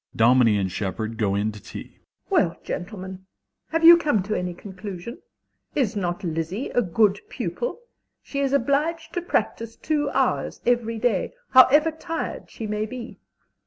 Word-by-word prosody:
_) - - -14
(Dominie 115 -2 +5
and 95 -2 -1
Shepard 110 +4 -3
go 100 -3 +1
in 105 +2 0
to 105 -1 -11
tea.) - - -9
MRS. - - -31
S. - - -33 0.3
Well, - - +2
gentlemen, 190 0 -6 0.4
have 325 +1 -1
you 340 +1 +11
come 290 - +1
to 210 +3 -3
any 180 -2 -2
conclusion? 195 +4 -8 0.6
Is 255 -9 +1
not 180 0 -2
Lizzie 165 - -3
a 245 - +2
good 205 +1 +2
pupil? 485 0 -4 0.4
She 280 - -4
is 275 -1 +1
obliged 290 +5 0
to 350 - -1
practise 230 -9 -2
two 295 -2 -1
hours - - 0
every 235 -2 +1
day, 240 - 0 0.2
however 290 +5 +7
tired 325 +1 -5
she 225 - -7
may 210 0 -2
be. 250 +1 -8
215 Hz, 165 wpm, -24 LUFS, 175-280 Hz, 0.6 s, you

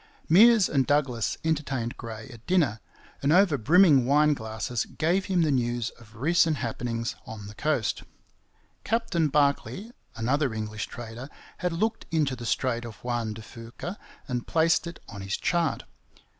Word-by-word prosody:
Meares 215 +3 +7
and 135 -3 +1
Douglas 135 -6 +1
entertained 140 -7 -1
Gray 110 -2 -8
at 115 -1 -15
dinner, 155 - +2 0.4
and 140 - +2
over 180 -2 +5
brimming 145 - +5
wine 150 +2 +4
glasses 110 -1 -3
gave 180 +4 0
him 180 -3 +2
the 155 - +2
news 120 -2 0
of 110 -2 -18
recent 160 +4 +2
happenings 115 -1 -3
on 105 -2 -8
the 105 - -9
coast. 145 -2 -1 0.8
Captain 215 -8 +1
Barkley, 150 - 0 0.2
another 130 +2 0
English 110 -1 -4
trader, 120 +3 -8 0.3
had 180 -1 -1
looked 220 +7 -1
into 150 -5 +1
the 120 -1 -7
Strait 120 -1 0
of 115 -3 -8
Juan 120 -3 -2
de 110 - -9
Fuca 120 - -8 0.3
and 125 -2 -3
placed 165 +1 +2
it 170 - -8
on 100 -3 -8
his 95 0 -2
chart. 170 -4 0
135 Hz, 155 wpm, -27 LUFS, 115-165 Hz, 0.8 s, Meares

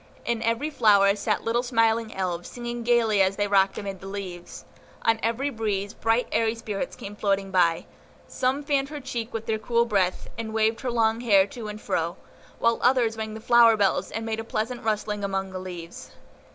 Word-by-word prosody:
In 235 -1 -1
every 230 +7 0
flower 200 -6 +5
sat 205 - -1
little 230 +1 +1
smiling 230 -2 +1
Elves, 175 -2 -3
singing 240 0 -5
gayly 230 -3 +3
as 190 +1 +2
they 205 0 0
rocked 195 -1 +3
amid 195 -2 -5
the 195 - -8
leaves. 185 -3 -7 0.4
On 225 -1 +3
every 240 +6 -1
breeze, 205 -3 -2
bright, 225 +2 +1
airy 225 0 +1
spirits 220 +2 -4
came 205 -4 -8
floating 195 -2 0
by; 170 -3 +2 0.4
some 265 +3 -1
fanned 280 -1 0
her 300 -1 -6
cheek 240 -4 -5
with 225 0 -5
their 220 -1 -1
cool 235 +2 +1
breath, 195 -5 0
and 220 -1 -4
waved 220 +1 +1
her 260 - -2
long 225 -1 +1
hair 200 -5 +5
to 220 +2 -8
and 210 0 -6
fro, 170 -3 -2 0.4
while 230 0 +2
others 245 -3 +3
rang 220 -1 -5
the - - -6
flower 230 0 +5
bells, 200 -2 +1
and 225 +1 -4
made 225 0 -2
a - - -3
pleasant 225 +2 -3
rustling 210 -1 -1
among 195 -1 -2
the 185 - -5
leaves. 175 -2 -8
220 Hz, 195 wpm, -25 LUFS, 200-235 Hz, 0.4 s, flower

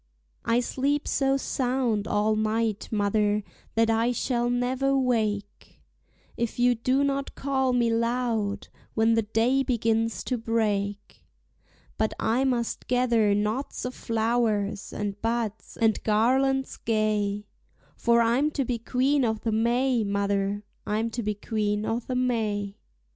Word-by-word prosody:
I 230 +1 +3
sleep 280 +4 -1
so 270 0 +2
sound 250 -5 -1
all 210 +1 +1
night, 215 0 -1
mother, 210 0 +1 0.3
that 225 0 +3
I 225 +2 +2
shall 240 0 0
never 255 +3 +1
wake, 215 -6 -1 0.6
If 235 -2 -3
you 245 0 +4
do 255 +4 +1
not 275 0 -1
call 265 -1 0
me 240 -2 +2
loud 230 -3 -1 0.3
when 225 +1 +3
the 225 - +3
day 225 +5 +1
begins 225 -5 0
to 250 -2 -2
break; 205 -3 -2 0.8
But 220 - 0
I 245 +4 +1
must 240 -3 -1
gather 235 -5 +3
knots 215 +8 -2
of 250 - -3
flowers 220 -4 -1
and 205 -1 -4
buds, 225 -2 -3
and 225 -2 +2
garlands 265 +5 +2
gay; 210 -2 0 0.5
For 235 0 +3
I'm 245 +6 +2
to 275 - +1
be 240 -1 -2
Queen 265 +4 +1
o' 220 -2 +1
the 220 +1 -3
May, 240 +2 +2
mother, 200 0 -1 0.2
I'm 220 +2 -1
to 240 - -3
be 210 -1 -2
Queen 210 0 -1
o' 225 - 0
the 250 +1 -5
May. 215 -5 -1
230 Hz, 135 wpm, -26 LUFS, 210-250 Hz, 0.8 s, you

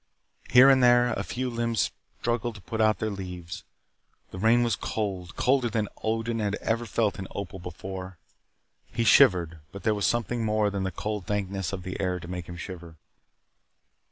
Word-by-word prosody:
Here 125 +2 +8
and 135 -1 +6
there 120 0 +5
a - - -2
few 130 +1 -3
limbs 115 -3 0 0.3
struggled 120 -1 -1
to 100 - -11
put 110 +5 -3
out 110 0 +4
their 110 - -2
leaves. 90 -3 -7 0.7
The 95 - -7
rain 115 +4 +4
was 120 -2 +1
cold, 95 -5 -4
colder 130 -1 +2
than 110 -2 -1
Odin 115 +1 -1
had 105 -1 0
ever 115 +2 -2
felt 105 -1 0
in 95 - -5
Opal 95 -1 -5
before. 95 +1 -7 0.7
He 115 - 0
shivered, 85 -6 +5
but 100 - -9
there 110 - +3
was 100 -1 +1
something 120 0 0
more 105 -1 +1
than 100 -1 -2
the 95 - -2
cold 105 +2 -4
dankness 95 -3 -2
of 95 -2 -5
the 90 0 -5
air 90 -2 -1
to 85 - -10
make 90 -1 -6
him 85 - -7
shiver. 85 -1 -8
105 Hz, 185 wpm, -27 LUFS, 95-115 Hz, 0.7 s, Here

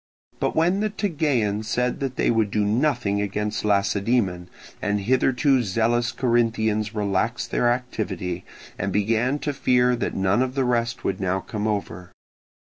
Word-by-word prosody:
But - - -1
when 175 +5 +2
the 215 +1 0
Tegeans 140 - -1
said 125 +3 0
that 135 -2 -3
they - - +2
would 110 -3 +1
do 105 +1 0
nothing 115 -3 +1
against 105 +1 -2
Lacedaemon, 100 -2 +1 0.3
the 105 -1 0
hitherto 130 +5 +2
zealous 120 +3 +1
Corinthians 115 -3 0
relaxed 105 +3 -1
their 120 - +2
activity, 95 -8 -3 0.4
and 100 - -1
began 115 +7 +1
to 145 0 -3
fear 125 -2 +3
that - - -3
none 95 +4 +2
of 130 0 -1
the 135 -2 +1
rest 120 -1 0
would 95 - -1
now 95 0 0
come 105 +2 -4
over. 90 -4 -3
110 Hz, 150 wpm, -24 LUFS, 100-125 Hz, 0.4 s, fear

